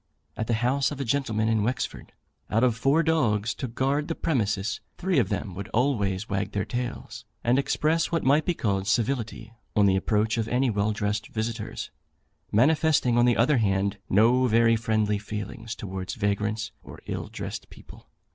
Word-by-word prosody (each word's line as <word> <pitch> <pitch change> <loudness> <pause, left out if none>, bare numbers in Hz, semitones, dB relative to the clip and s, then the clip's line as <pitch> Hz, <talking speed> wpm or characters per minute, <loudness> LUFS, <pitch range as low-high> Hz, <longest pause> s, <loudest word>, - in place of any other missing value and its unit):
At 110 - -3
the 115 - +1
house 135 +1 +2
of 145 - -7
a 135 - -2
gentleman 115 -4 0
in 110 -1 +2
Wexford, 120 +4 -3 0.4
out 115 +3 +2
of 125 -3 +3
four 135 +7 +2
dogs 115 -10 +1
kept - - -9
to 130 - -2
guard 135 +5 0
the 165 - -2
premises, 110 -8 -1 0.2
three 185 -5 +1
of 105 -6 +1
them 100 -2 -3
would 95 +2 -6
always 110 -6 +1
wag 100 0 -2
their 100 -2 -1
tails, 120 0 -5 0.2
and 125 +3 +3
express 155 +3 +1
what 165 -2 0
might 145 +4 +4
be 175 - 0
called 100 -6 -1
civility, 115 -1 -1 0.2
on 105 - +5
the 95 -1 +4
approach 105 +3 +1
of 110 - -1
any 125 +1 +1
well 105 0 +1
dressed 105 0 -2
visitors; 110 0 -4 0.6
manifesting, 145 +1 +3
on 120 0 +5
the 120 -1 +3
other 130 +5 +4
hand, 100 -2 +1
no 120 +6 +4
very 115 0 +4
friendly 110 -2 0
feelings 105 +2 -6
towards 95 +1 -5
vagrants 105 -1 -1
or - - -11
ill - - -4
dressed - - -6
people. - - -15
115 Hz, 180 wpm, -26 LUFS, 105-130 Hz, 0.6 s, on